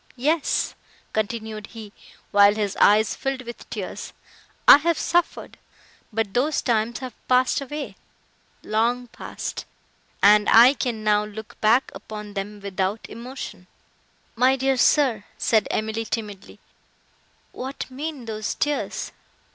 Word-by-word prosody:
Yes," 300 +5 0 0.4
continued 215 -1 -3
he, 220 -3 -11 0.4
while 205 0 +6
his 205 -2 -2
eyes 210 +1 +4
filled 270 -1 -3
with 240 -1 -10
tears, - - -6 0.5
"I - - +11
have 330 +2 0
suffered!—but 225 - -3
those 285 +5 +1
times 230 -1 0
have 255 -2 -6
passed 255 +2 +3
away—long 245 -4 -4
passed! - - -6 0.6
and 210 +1 +6
I 240 +4 +8
can 235 -6 -3
now 210 -1 +3
look 215 +1 -9
back 230 +5 +3
upon 210 -1 -8
them 205 +1 -5
without 195 +1 -2
emotion." 240 -6 -8 0.7
"My 255 +3 +4
dear 270 0 +1
sir," 255 -5 +3
said 220 -3 +2
Emily, 220 +1 -2
timidly, 210 -4 -6 0.9
"what 265 +2 -6
mean 285 -1 -6
those 215 -1 -4
tears? 295 -1 -2
225 Hz, 115 wpm, -23 LUFS, 210-260 Hz, 0.9 s, I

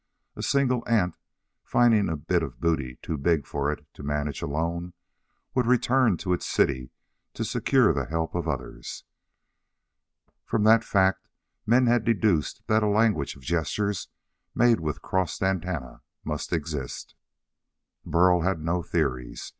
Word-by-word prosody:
A - - -6
single 125 -3 +1
ant, 95 -7 +2 0.5
finding 115 -5 +3
a 80 - -2
bit - - 0
of - - -6
booty 70 -5 -1
too 80 - -3
big 80 0 +1
for 70 0 -1
it 75 0 -7
to - - -12
manage 75 0 -2
alone, 85 +4 -3 0.6
would 125 -3 +1
return 125 -4 +3
to 90 +2 -1
its 90 - -2
city 65 -2 +1 0.5
to - - -2
secure - - +3
the - - -1
help 80 +1 -2
of 85 -2 -2
others. 65 -5 -5 1.4
From 110 - 0
that 110 +1 +6
fact 95 -2 +1 0.4
men 125 +3 +5
had 120 -1 +3
deduced 105 - +1
that 110 0 +2
a 105 - +2
language 105 -8 +2
of 70 - -16
gestures 85 +6 -1 0.5
made 120 -3 +4
with 75 -2 -4
crossed 95 0 -1
antennae 90 -8 -2 0.3
must - - -4
exist. 75 -5 -4 0.9
Burl 90 0 +3
had 90 0 0
no 85 +3 -1
theories. 65 -6 -2
85 Hz, 145 wpm, -26 LUFS, 75-110 Hz, 1.4 s, that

